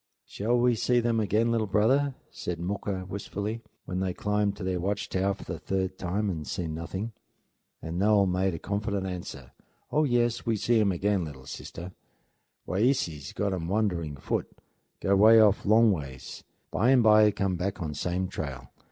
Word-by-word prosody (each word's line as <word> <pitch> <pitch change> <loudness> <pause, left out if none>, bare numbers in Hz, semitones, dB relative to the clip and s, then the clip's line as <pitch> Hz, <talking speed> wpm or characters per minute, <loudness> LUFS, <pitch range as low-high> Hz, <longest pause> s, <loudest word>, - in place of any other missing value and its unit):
"Shall 115 +4 0
we 120 0 +4
see 120 +2 +2
them 115 -1 +1
again, 110 +2 +2
little 115 -2 +1
brother?" 130 +7 +2 0.2
said 85 -2 -5
Mooka 95 +1 -3
wistfully, 100 +3 -4 0.2
when 90 - -3
they 95 - 0
had 90 - -4
climbed 105 -1 0
to 105 - -7
their 90 -1 -1
watch 100 +3 -2
tower 95 +1 0
for - - -11
the - - -6
third 95 -1 -2
time 100 +4 -1
and 80 -6 -3
seen 80 -3 -3
nothing. 95 +7 -4 0.7
And 85 +2 -4
Noel 105 0 +4
made 90 -2 0
confident 100 -1 -2
answer: 85 -9 -6 0.4
"Oh, 150 - +3
yes, 120 -3 +1
we 115 -2 0
see 115 +2 +2
um 100 -2 +3
again, 95 +1 0
lil 65 -4 -10
sister. 85 +6 -8 0.8
Wayeeses 90 - 0
got 100 -1 0
um 85 -3 -3
wandering 90 -7 -1
foot; - - -2 0.5
go 100 - +3
'way 110 +3 +7
off 105 -2 +4
long 110 +1 +6
ways; 70 -8 -6 0.3
bimeby 110 -4 +5
come 100 -2 0
back 95 +4 -3
on 80 -4 -3
same 90 +4 -2
trail. 65 -8 -6
100 Hz, 170 wpm, -28 LUFS, 90-110 Hz, 0.8 s, way